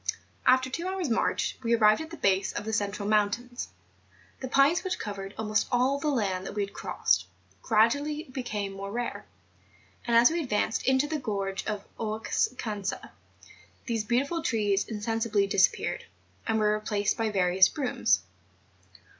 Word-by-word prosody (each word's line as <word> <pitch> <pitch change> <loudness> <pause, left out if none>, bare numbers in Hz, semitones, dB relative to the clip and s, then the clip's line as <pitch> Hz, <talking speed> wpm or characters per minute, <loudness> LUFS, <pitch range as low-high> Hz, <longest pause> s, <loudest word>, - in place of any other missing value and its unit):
After 260 +1 +5
two 335 +7 -4
hours' 375 -7 -2
march, 225 - 0
we 235 -1 +2
arrived 215 +2 +4
at 315 - -7
the 335 - -9
base 195 -5 +1
of - - -4
the 220 - -3
central 205 -1 -1
mountains. 225 +4 0 0.7
The 260 - -4
pines 275 +6 +4
which 375 - -2
covered 200 -2 -6
almost 215 -1 0
all 260 +3 +2
the 300 - -2
land 195 -9 0
that - - -7
we 205 - 0
had 200 - -7
crossed, - - 0 0.3
gTadually 270 +6 +1
became 210 -7 -3
more 195 +1 -6
rare; 240 +2 -4 0.8
and 235 -1 +4
as 240 +5 +7
we 340 +1 0
advanced 220 -4 -1
into 265 +1 +4
the 305 0 -2
gorge 195 -5 -3
of 210 -1 -3
Oucanca 215 -1 -2 0.7
these 230 -3 -1
beautiful 275 +9 0
trees 205 -7 +1
insensibly 220 -1 0
disappeared, 195 -1 +1 0.4
and 225 - +2
were 210 -1 +3
replaced 210 -1 0
by 225 -1 0
viscous 185 -2 +4
brooms. 250 - +1
220 Hz, 155 wpm, -28 LUFS, 205-260 Hz, 0.8 s, as